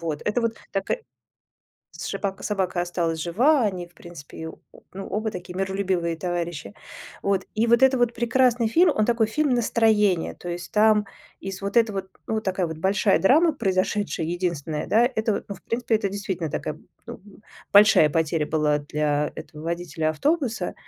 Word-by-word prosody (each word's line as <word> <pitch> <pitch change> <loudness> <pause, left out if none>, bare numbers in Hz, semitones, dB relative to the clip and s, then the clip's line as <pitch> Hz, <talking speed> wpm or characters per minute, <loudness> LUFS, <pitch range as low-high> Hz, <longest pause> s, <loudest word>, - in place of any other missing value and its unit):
Вот. 160 -3 -4
Это 210 +4 0
вот 230 -1 -1 0.2
така 195 - -1 1.0
сшипака 195 -1 -4
собака 190 -4 -1
осталась 170 -2 -2
жива, 245 - +3
они 185 -4 -2
в 175 - -25
принципе 170 -4 -12
её 160 0 -6 0.2
о - - -16
ну, 195 0 -6
оба 215 +1 -2
такие 180 -1 -8
миролюбивые 190 -3 -1
товарищи. 175 -1 -4 0.5
Вот. 195 -1 0
И 225 +2 +1
вот 235 +2 +4
это 265 -1 +5
вот 240 -1 +1
прекрасный 240 -1 +2
фильм, 335 +7 +4
он 215 - +2
такой 230 -1 +2
фильм-настроение. 220 - +2
То 175 - -9
есть 175 +1 -6
там 210 0 +4 0.4
из 195 0 -6
вот 200 +3 -4
этого 215 -4 +2
т 190 - -25 0.2
ну, 220 - -2
вот 220 - -2
такая 185 -2 0
вот 160 -1 -6
большая 195 +3 +2
драма 315 - +4
произошедшая, 195 - -1
единственная 170 -3 -3
да, 230 +3 +4
это 220 0 0
вот - - -4
ну, 200 - -5
в - - -20
принципе, 230 -1 0
это 200 -2 -1
действительно 190 -5 -4
такая, - - -4 0.3
ну, - - -9 0.5
большая 205 -6 +7
потеря 160 -1 0
была 150 -1 +1
для 145 0 -1
этого 150 0 -10
водителя 165 -2 -2
автобуса, 240 - -1
195 Hz, 170 wpm, -24 LUFS, 170-220 Hz, 1.0 s, большая